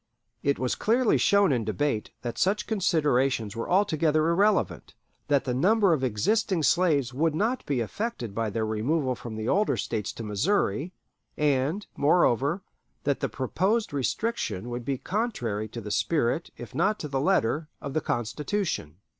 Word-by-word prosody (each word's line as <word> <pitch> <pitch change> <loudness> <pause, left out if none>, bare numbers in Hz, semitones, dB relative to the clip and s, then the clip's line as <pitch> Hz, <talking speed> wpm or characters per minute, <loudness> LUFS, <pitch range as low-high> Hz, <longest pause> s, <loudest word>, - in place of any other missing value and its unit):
It 140 0 +1
was 130 -1 -1
clearly 235 +1 +2
shown 200 -4 +4
in 120 -4 +1
debate 110 +1 -1
that 120 -1 -4
such 210 +3 +1
considerations 145 - +1
were 115 - -4
altogether 160 -4 +2
irrelevant; 200 +4 +1 0.3
that 145 -2 +2
the 125 - -2
number 195 - +4
of 140 -4 -1
existing 170 - +1
slaves 145 -7 +2
would 155 +3 +1
not 225 +9 0
be 135 -4 0
affected 120 - -4
by 115 +1 -1
their 110 +2 -1
removal 130 +6 0
from 120 -2 -7
the 110 +1 -4
older 210 +8 +2
States 105 -3 -2
to 115 - -7
Missouri; 135 - 0 0.5
and, 150 +6 +1
moreover, 145 - +2 0.4
that 140 - 0
the - - -1
proposed 190 - 0
restriction 130 - -2
would 120 0 -5
be 135 0 -1
contrary 125 - -2
to 115 - -7
the 105 -1 -6
spirit, 155 +4 0
if - - -9
not 200 +6 +1
to 150 - -5
the 135 -2 -1
letter, 155 -3 +1
of 140 -2 -6
the 155 - 0
Constitution. 120 - -2
145 Hz, 160 wpm, -27 LUFS, 120-190 Hz, 0.5 s, shown